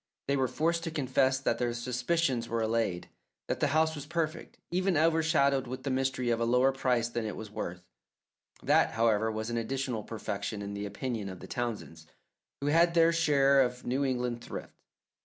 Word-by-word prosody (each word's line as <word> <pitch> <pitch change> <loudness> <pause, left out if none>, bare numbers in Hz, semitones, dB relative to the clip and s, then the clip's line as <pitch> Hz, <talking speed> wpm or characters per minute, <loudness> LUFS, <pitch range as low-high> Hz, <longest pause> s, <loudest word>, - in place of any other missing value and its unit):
They 140 - +2
were 130 -1 +1
forced 165 +6 0
to - - -1
confess 135 -3 +1
that 115 -3 0
their 120 -1 0
suspicions 125 +1 0
were 115 -1 0
allayed, 110 -5 -1 0.4
that - - -2
the - - +2
house 160 +2 +2
was 145 -2 -7
perfect, 165 0 -3
even 185 -1 +1
overshadowed 155 -4 +3
with 130 +1 -6
the 135 - -1
mystery 130 -2 0
of 115 - +1
a - - +1
lower 125 +3 +4
price 125 -3 +1
than 120 -1 -3
it 110 - -4
was 110 -1 -8
worth. 90 -3 -5 0.8
That, - - +3
however, 110 -1 +2
was 110 +1 -4
an 120 - -1
additional 125 0 -2
perfection 105 -1 -4
in 100 0 -5
the 100 0 -4
opinion 105 0 -4
of 95 -1 -8
the - - -9
Townsends, 105 -10 -5 0.5
who - - -3
had 170 +2 +4
their 165 0 +5
share 140 -4 +4
of 125 -1 -1
New 130 +3 0
England 125 -3 -1
thrift. - - -7
125 Hz, 190 wpm, -30 LUFS, 115-145 Hz, 0.8 s, their